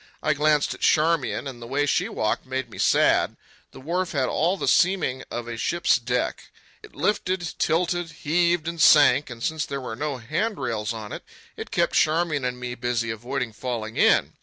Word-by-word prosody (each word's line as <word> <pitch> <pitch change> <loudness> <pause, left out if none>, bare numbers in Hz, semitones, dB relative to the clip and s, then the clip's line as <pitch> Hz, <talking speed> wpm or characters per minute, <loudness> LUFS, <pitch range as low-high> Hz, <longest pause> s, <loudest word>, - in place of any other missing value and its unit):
I 155 - +2
glanced 150 0 +2
at - - -12
Charmian, 160 -3 +2
and 125 -3 -8
the 115 - -8
way 140 +3 0
she 145 - 0
walked 110 +4 -2
made 130 -2 -4
me - - -10
sad. - - +3 0.3
The - - -13
wharf 175 +6 -2
had 135 -3 0
all 175 +5 +1
the - - -3
seeming 170 -8 +2
of 120 0 -5
a 120 -1 -5
ship's 175 +9 +2
deck. - - -2 0.3
It 430 - -15
lifted, 185 -4 -1
tilted, 175 +1 0
heaved 170 +1 0
and 165 -1 -3
sank; 145 -2 +6
and 115 -2 -8
since 160 -1 -1
there 140 0 -4
were 125 -4 -6
no 145 +1 -3
handrails 130 - -2
on 110 -2 -7
it, - - -7 0.3
it - - -7
kept - - 0
Charmian 155 -2 +2
and 125 0 -3
me 125 0 -4
busy 120 -2 -2
avoiding 120 +1 -4
falling 110 -1 -5
in. - - +3
145 Hz, 185 wpm, -24 LUFS, 120-165 Hz, 0.3 s, sank